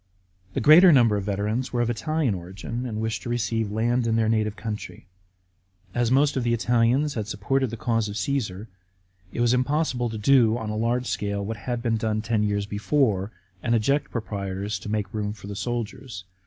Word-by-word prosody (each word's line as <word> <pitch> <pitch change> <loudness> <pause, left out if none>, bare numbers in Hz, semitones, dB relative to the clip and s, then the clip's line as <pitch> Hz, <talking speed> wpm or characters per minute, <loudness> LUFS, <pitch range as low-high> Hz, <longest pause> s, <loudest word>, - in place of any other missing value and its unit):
The - - 0
greater 170 +8 +8
number 120 -7 +5
of 100 -1 -2
the 105 - -1
veterans 105 +6 -2
were 120 - 0
of 120 - 0
Italian 155 0 0
origin, 95 +7 -5
and 110 -2 -4
wished 110 0 -2
to - - -6
receive 115 -2 -1
land 115 +3 +1
in 115 - +1
their 115 -1 +2
native 110 -1 +1
country. 105 -6 -6 0.9
As 120 -1 +1
most 140 +3 +3
of 130 - 0
the 120 0 +2
Italians 120 +5 +2
had 110 -5 -3
supported 125 +6 0
the 115 - -6
cause 115 -1 0
of 100 - -6
Cassar, 105 -3 -2 0.6
it - - -3
was 120 0 +3
impossible 130 -1 0
to 110 - -5
do 115 0 +4
on 110 -2 -4
a - - -3
large 120 +3 0
scale 100 -3 -2
what 110 +1 -4
had 120 +2 -4
been 115 -2 +1
done 110 -1 -1
ten 115 -1 0
years 100 -1 0
before, 105 -1 0 0.3
and 120 0 +1
eject 140 +6 +1
proprietors 100 -3 -4
to 105 - -8
make 105 -2 -2
room 105 -1 -2
for 105 - -13
the 100 0 -6
soldiers. 115 -1 -4
115 Hz, 200 wpm, -25 LUFS, 105-120 Hz, 0.9 s, greater